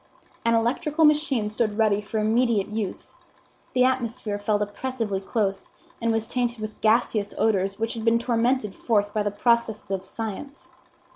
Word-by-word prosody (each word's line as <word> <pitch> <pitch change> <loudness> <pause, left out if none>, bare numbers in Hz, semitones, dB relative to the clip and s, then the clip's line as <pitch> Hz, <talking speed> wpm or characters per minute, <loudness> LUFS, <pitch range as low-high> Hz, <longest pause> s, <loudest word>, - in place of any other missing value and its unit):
An 230 0 +3
electrical 295 +7 +2
machine 295 -7 +3
stood 215 0 -1
ready 210 -2 +3
for 215 +2 -5
immediate 220 -1 +2
use. 210 -3 -4 0.6
The 255 - +4
atmosphere 235 -5 -1
felt 210 0 +1
oppressively 210 -1 -3
close, 195 -1 -2 0.3
and 230 0 +1
was 225 0 0
tainted 240 -2 -1
with 215 0 -7
gaseous 215 -2 +2
odors 195 -3 +1
which 225 0 -1
had 225 - -5
been 230 0 +4
tormented 235 -2 0
forth 205 -2 0
by 215 - +1
the 205 - 0
processes 220 -1 0
of 190 -1 -2
science. 225 +8 -6
225 Hz, 155 wpm, -25 LUFS, 205-240 Hz, 0.6 s, The